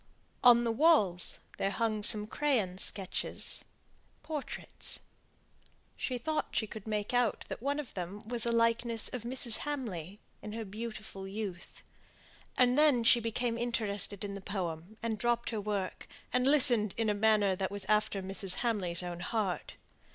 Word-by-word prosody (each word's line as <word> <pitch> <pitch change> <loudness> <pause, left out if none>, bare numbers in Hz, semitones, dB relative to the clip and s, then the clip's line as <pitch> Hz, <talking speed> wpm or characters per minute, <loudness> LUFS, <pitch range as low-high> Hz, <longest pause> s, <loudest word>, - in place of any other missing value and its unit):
On 240 -1 +8
the 230 - +1
walls 225 - +3 0.2
there 195 - +1
hung 215 0 -1
some 210 0 +4
crayon 215 -8 0
sketches 195 -1 0 0.6
portraits. 300 -2 -5 0.9
She 255 - -2
thought 310 +6 -1
she 220 - +2
could 215 0 -9
make 210 +1 -2
out 245 -2 +1
that - - -5
one 285 +3 -1
of 285 -6 -6
them 185 +2 -5
was 235 0 -3
a - - +2
likeness 230 0 +2
of 250 - -5
Mrs. 240 -1 +1
Hamley, 210 - -5 0.2
in 210 - -7
her 225 0 -4
beautiful 210 -2 -7
youth. 195 -2 -6 0.7
And 250 +2 +4
then 290 -6 +5
she 235 +1 +6
became 230 +1 -2
interested 210 -4 -1
in 200 -1 -4
the 200 - -7
poem, 185 0 -5
and 220 -2 -2
dropped 240 0 0
her 220 -2 -2
work, 200 -2 -3 0.3
and 250 +1 +3
listened 250 -8 +5
in 225 -1 +1
a 210 - +3
manner 205 -2 +3
that 190 0 -2
was 200 -1 -3
after 210 -2 +1
Mrs. 195 0 -1
Hamley's 185 -7 +2
own 175 -1 -5
heart. 195 -2 -2
220 Hz, 160 wpm, -32 LUFS, 195-240 Hz, 0.9 s, On